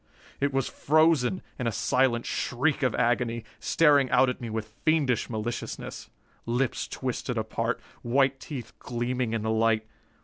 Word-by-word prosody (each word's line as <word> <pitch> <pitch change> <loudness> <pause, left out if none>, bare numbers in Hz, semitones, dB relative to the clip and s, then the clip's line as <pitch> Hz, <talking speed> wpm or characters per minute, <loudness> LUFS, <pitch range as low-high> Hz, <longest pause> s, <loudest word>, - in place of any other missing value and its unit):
It 140 0 +1
was 135 -1 0
frozen 155 0 +2 0.2
in 125 - -1
a - - +1
silent 120 +2 +1
shriek 140 +5 0
of 130 -4 +1
agony, 115 -1 +1 0.2
staring 145 -5 +4
out 125 0 +4
at 125 - -4
me 120 - -4
with 110 0 -4
fiendish 150 -6 +2
maliciousness. 115 +1 -5 0.4
Lips 120 +2 0
twisted - - -3
apart. - - -1 0.2
White 135 +2 +2
teeth 135 -5 -7
gleaming 120 -1 -2
in 115 -2 -1
the 110 - 0
light. 110 0 +2
125 Hz, 145 wpm, -27 LUFS, 115-135 Hz, 0.4 s, staring